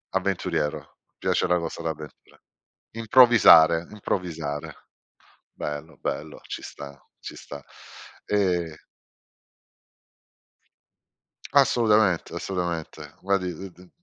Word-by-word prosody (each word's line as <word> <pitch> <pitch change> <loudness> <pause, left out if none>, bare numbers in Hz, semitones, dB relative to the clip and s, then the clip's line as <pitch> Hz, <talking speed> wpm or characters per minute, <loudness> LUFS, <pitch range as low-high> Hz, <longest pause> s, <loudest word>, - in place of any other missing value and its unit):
Avventuriero, 75 - -2
ti - - -50
piace - - 0
la 90 - +2
cosa 85 0 -5
d'avventura. 75 -2 -8 0.6
Improvvisare, 110 -9 +6
improvvisare, 80 -8 -5 0.7
bello, 75 +1 -6
bello, 75 +1 -5
ci - - -6
sta, 70 -1 -10 0.2
ci - - -9
sta. 70 -1 -10 0.6
Ehm 90 -6 0 2.8
Assolutamente, 105 -8 +3
assolutamente. 85 -2 -5
Guardi 95 -2 -1
d 95 +3 -9
t 90 +1 -18
t - - -24
85 Hz, 90 wpm, -25 LUFS, 80-95 Hz, 2.8 s, Improvvisare